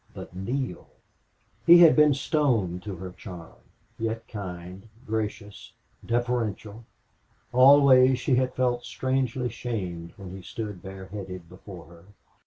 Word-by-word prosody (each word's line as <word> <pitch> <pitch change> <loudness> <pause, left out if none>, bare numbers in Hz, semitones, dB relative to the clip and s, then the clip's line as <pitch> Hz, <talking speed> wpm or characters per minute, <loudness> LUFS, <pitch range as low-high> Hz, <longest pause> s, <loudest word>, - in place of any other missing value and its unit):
But - - -10
Neale! 120 +1 -4 0.8
He 170 +1 +9
had 170 -2 +8
been 150 -2 +5
stone 120 - 0
to 100 +1 -7
her 90 +1 -8
charm, 90 -2 -11 0.4
yet 115 0 -3
kind, 95 0 -8 0.2
gracious, 105 -2 -5 0.3
deferential. 115 -2 -2 0.7
Always 130 0 +7
she 135 - 0
had 130 0 +1
felt 125 -1 0
strangely 130 -1 -1
shamed 95 -8 -5
when 95 -3 -9
he 95 - -9
stood 105 0 -7
bareheaded 95 -2 -8
before 90 -1 -12
her. 85 +1 -17
110 Hz, 120 wpm, -26 LUFS, 95-125 Hz, 0.8 s, He